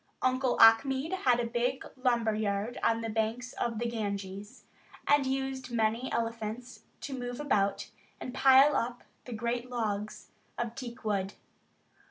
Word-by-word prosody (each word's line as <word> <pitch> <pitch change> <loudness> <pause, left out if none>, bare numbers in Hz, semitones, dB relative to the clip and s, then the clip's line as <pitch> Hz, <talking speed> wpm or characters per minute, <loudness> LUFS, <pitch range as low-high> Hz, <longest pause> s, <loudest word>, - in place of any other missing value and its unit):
Uncle 255 0 +1
Achmed 265 +8 +5
had 255 -10 +2
a 240 - 0
big 245 +3 -1
lumber 240 -4 +1
yard 210 +2 -2
on 230 0 +2
the 225 - -3
banks 225 +3 -2
of 230 -2 -2
the 240 - -2
Ganges, 200 -3 -5 0.4
and 290 -2 +4
used 265 -1 -2
many 230 +2 0
elephants 230 +2 -4 0.2
to 280 - -5
move 245 0 -5
about 200 -9 0 0.3
and 250 - -6
pile 270 +2 +6
up 245 -1 -2 0.2
the 250 - -9
great 235 +2 -2
logs 215 -4 -3 0.3
of 235 -1 -3
teak 245 -2 -8
wood. 200 -2 -1
235 Hz, 145 wpm, -30 LUFS, 220-255 Hz, 0.4 s, pile